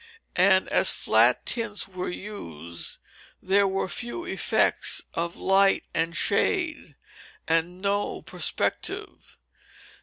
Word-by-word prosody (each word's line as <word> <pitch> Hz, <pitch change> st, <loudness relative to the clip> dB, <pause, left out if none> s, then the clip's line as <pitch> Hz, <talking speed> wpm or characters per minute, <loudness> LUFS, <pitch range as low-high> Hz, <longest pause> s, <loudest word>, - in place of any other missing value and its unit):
And 190 Hz, +1 st, +4 dB
as -, -, +3 dB
flat 115 Hz, +3 st, +3 dB
tints 230 Hz, -4 st, -1 dB
were 185 Hz, -1 st, -5 dB
used 85 Hz, -, -6 dB, 0.4 s
there 195 Hz, +1 st, +3 dB
were 190 Hz, 0 st, -1 dB
few 245 Hz, -, -5 dB
effects -, -, +1 dB
of 170 Hz, +1 st, -3 dB
light 195 Hz, 0 st, +3 dB
and 165 Hz, +1 st, -1 dB
shade, 320 Hz, -, 0 dB, 0.5 s
and 165 Hz, +2 st, 0 dB
no 200 Hz, +1 st, -1 dB
perspective. 405 Hz, +2 st, -2 dB
190 Hz, 100 wpm, -26 LUFS, 170-205 Hz, 0.5 s, And